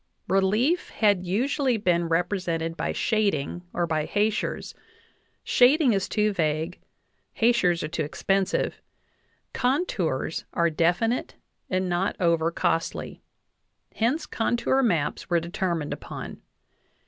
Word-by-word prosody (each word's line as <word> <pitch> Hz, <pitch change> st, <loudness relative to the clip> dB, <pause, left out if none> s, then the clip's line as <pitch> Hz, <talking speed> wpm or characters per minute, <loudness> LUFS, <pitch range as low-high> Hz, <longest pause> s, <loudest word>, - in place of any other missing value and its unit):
Relief 210 Hz, -, +2 dB
had 200 Hz, -4 st, +2 dB
usually 255 Hz, -, +1 dB
been 175 Hz, -4 st, +1 dB
repre 170 Hz, +2 st, +1 dB
sented 165 Hz, -1 st, -2 dB
by -, -, -2 dB
shading 200 Hz, -8 st, 0 dB
or 175 Hz, -, 0 dB
by 155 Hz, -2 st, -1 dB
hachures; 210 Hz, +1 st, -1 dB, 0.7 s
shading 260 Hz, 0 st, +4 dB
is 195 Hz, -1 st, -1 dB
too 210 Hz, -1 st, +1 dB
vague, 160 Hz, 0 st, -1 dB, 0.6 s
hach 235 Hz, +1 st, +3 dB
ures 175 Hz, -2 st, +2 dB
are -, -, -1 dB
too 160 Hz, -, -3 dB
expensive, 195 Hz, +6 st, -1 dB, 0.7 s
contours 215 Hz, -, -1 dB
are 170 Hz, -1 st, +2 dB
definite 175 Hz, +10 st, +1 dB, 0.3 s
and 185 Hz, 0 st, 0 dB
not 180 Hz, +3 st, 0 dB
over 165 Hz, -2 st, +2 dB
costly; 165 Hz, -1 st, -2 dB, 0.7 s
hence 250 Hz, +8 st, 0 dB
contour 240 Hz, +3 st, +1 dB
maps 175 Hz, -, 0 dB
were 170 Hz, -1 st, +3 dB
determined 170 Hz, -2 st, -2 dB
upon. -, -, -8 dB
185 Hz, 115 wpm, -26 LUFS, 170-225 Hz, 0.7 s, shading